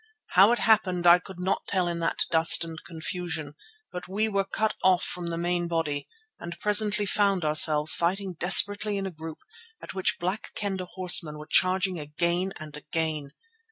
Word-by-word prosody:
How 195 +5 +5
it 240 - +1
happened 185 -7 +1
I 175 +1 +7
could 185 0 -13
not 185 +2 -3
tell 185 -3 0
in 170 -1 -4
that 165 - -1
dust 165 0 +4
and 165 -1 -9
confusion, 160 -2 -6 0.4
but 180 0 -8
we 210 +4 -1
were 200 -2 -1
cut 215 +2 -2
off 185 -1 +3
from 175 -1 -5
the 165 0 -4
main 175 0 -2
body 160 -4 -3 0.3
and 170 - -9
presently 210 0 +2
found 200 -3 0
ourselves 150 0 +6
fighting 185 +2 -2
desperately 205 +4 +3
in 195 - -4
a 190 - -5
group 160 -1 -10 0.4
at - - -10
which 190 -1 -1
Black 185 +5 -5
Kendah 190 -3 -4
horsemen 175 -5 +3
were 150 - -10
charging 185 +1 +1
again 170 +5 -2
and 155 -1 -10
again. 155 -2 -4
180 Hz, 175 wpm, -26 LUFS, 160-195 Hz, 0.4 s, I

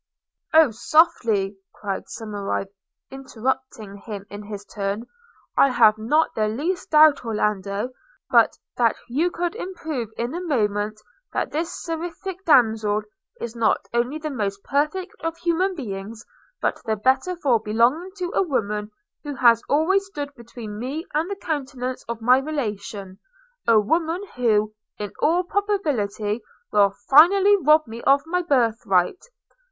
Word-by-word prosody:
'Oh, 320 -6 +7
softly!' 220 - +2 0.2
cried 200 -2 -4
Somerive, 205 -3 -4 0.4
interrupting 260 -5 -4
him 200 -1 -8
in 205 +1 -7
his 205 -1 -8
turn, 200 +3 -3 0.5
'I 275 - +5
have 215 -3 +5
not 300 +9 +2
the 215 -1 0
least 315 - -2
doubt, 305 -3 +6
Orlando, 210 0 -1 0.4
but - - +5 0.2
that 235 -2 +3
you 295 +9 +1
could 350 +2 -3 0.2
prove 275 -10 -4
in 240 +4 -2
a 350 - -3
moment 215 - -1 0.3
that - - -1
this 325 +3 -3
seraphic 345 +3 -5
damsel 220 -7 +3 0.4
is 235 0 -5
not 230 -2 +3 0.2
only 240 +5 0
the 310 -1 -5
most 200 -6 -3
perfect 310 +7 -1
of 330 0 -3
human 355 +3 0
beings, 215 - -7 0.3
but - - -1
the 220 -1 0
better 260 - +1
for 270 -9 +2
belonging 235 - +1
to 360 -1 -3
a - - +3
woman 210 - -1 0.3
who 290 -2 -5
has 235 -2 +5
always 385 +7 +2
stood 290 -7 -6
between 230 -4 -9
me 280 +8 -4
and 315 +4 0
the 400 - -3
countenance 265 -8 -4
of 235 -1 -4
my 250 +3 +6
relation; 210 -9 -5 0.5
a 230 -2 +6
woman 325 - 0
who, 215 -3 +2 0.2
in 205 -1 -5
all 345 +4 +2
probability, 280 - -1 0.3
will 205 -1 +5 0.2
finally 385 +8 +7
rob 305 -2 +4
me 230 0 -8
of 275 +1 +3
my 360 +2 0
birth 245 -9 +1
right. 185 - +2
250 Hz, 145 wpm, -23 LUFS, 215-320 Hz, 0.5 s, Oh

